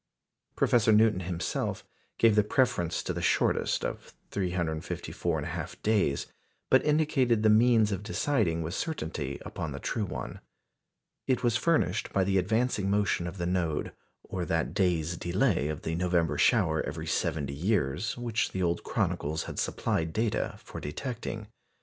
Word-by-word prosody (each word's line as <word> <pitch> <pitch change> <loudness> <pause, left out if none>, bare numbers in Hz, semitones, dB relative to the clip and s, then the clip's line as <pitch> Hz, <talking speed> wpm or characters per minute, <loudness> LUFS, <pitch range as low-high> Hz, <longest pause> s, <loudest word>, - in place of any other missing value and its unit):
Professor 115 -2 +3
Newton 110 -2 +5
himself 90 -1 -3 0.3
gave 115 -2 +5
the 105 - +5
preference 105 -6 +1
to - - -2
the - - -4
shortest - - +1
of - - -6 0.2
354 90 -5 -2
1/2 - - -5
days, 100 -10 +2 0.5
but - - +6
indicated 140 -7 +2
the 110 - +6
means 110 -1 +5
of 95 -1 -2
deciding 105 - 0
with 80 +2 -4
certainty 80 - -3
upon 80 -3 -4
the 70 - -5
true 105 - -2
one. 90 - -6 0.9
It 130 -1 +1
was 120 -2 +2
furnished 160 +8 +1
by 95 - +2
the 95 0 +2
advancing 110 +1 0
motion 100 -3 +1
of 90 +3 -7
the 85 - -2
node, 85 -4 -1 0.3
or 90 -2 -4
that 80 -1 -1
day's 85 -3 +1
delay 90 - +1
of 75 -1 -4
the 80 - -2
November 85 -1 +1
shower 80 0 +3
every 80 +2 -5
seventy 80 -4 -1
years, 90 - 0
which 120 -2 -1
the 95 - -1
old 85 0 0
chronicles 80 +2 -1
had - - -6
supplied 80 0 -1
data 110 0 0
for - - -8
detecting. 110 - -5
95 Hz, 150 wpm, -29 LUFS, 80-110 Hz, 0.9 s, but